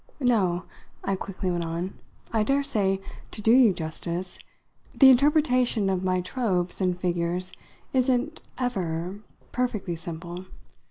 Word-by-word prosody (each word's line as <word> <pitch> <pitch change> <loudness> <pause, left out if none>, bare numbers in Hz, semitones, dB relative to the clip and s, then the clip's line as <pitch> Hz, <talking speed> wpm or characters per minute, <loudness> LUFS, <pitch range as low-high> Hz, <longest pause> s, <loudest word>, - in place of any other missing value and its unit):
No," 195 -9 +2 0.4
I 195 - 0
quickly 190 -1 -3
went 175 -1 -1
on, 170 +3 -3 0.4
"I 220 - +3
daresay, 220 -6 +1 0.3
to - - -7
do 220 +2 +3
you 245 -3 +7
justice, 170 +2 -3 0.6
the 270 -1 +9
interpretation 255 -6 +3
of 185 -1 -1
my 185 -1 +1
tropes 185 -4 -1
and 180 -1 +1
figures 180 0 -1 0.4
isn't 260 +3 +1 0.2
'ever' 185 -7 -2 0.3
perfectly 215 -8 -1
simple. 175 +2 -7
190 Hz, 120 wpm, -26 LUFS, 175-245 Hz, 0.6 s, the